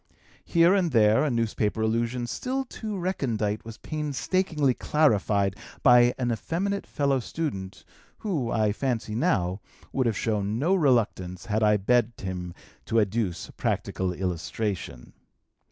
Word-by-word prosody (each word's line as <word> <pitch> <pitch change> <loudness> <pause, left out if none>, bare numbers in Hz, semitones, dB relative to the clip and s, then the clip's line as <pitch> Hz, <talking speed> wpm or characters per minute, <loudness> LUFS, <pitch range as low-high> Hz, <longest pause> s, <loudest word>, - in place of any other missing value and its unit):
Here 170 +1 +4
and 190 -4 +2
there 110 0 +4
a 155 - +1
newspaper 115 -3 0
allusion 115 +2 0
still 265 - -3
too 215 -4 -5
recondite 115 - -1
was 115 -1 -9
painstakingly 150 +1 0
clarified 105 -10 +2 0.3
by 125 -1 +6
an 125 -2 0
effeminate 175 - -2
fellow 140 -3 +1
student, 115 - -5 0.4
who, 155 - -1
I 110 -2 +2
fancy 115 -2 -2
now, 100 - 0 0.3
would 130 -2 +1
have 110 -3 0
shown 105 -1 -1
no 160 +9 +2
reluctance 110 - +1
had 110 +1 0
I 105 -1 +4
begged 120 +3 +1
him 90 -2 -5 0.3
to 115 - +2
adduce 105 -3 -1
practical 95 -1 -1
illustration. 90 - -4
115 Hz, 130 wpm, -26 LUFS, 105-150 Hz, 0.4 s, by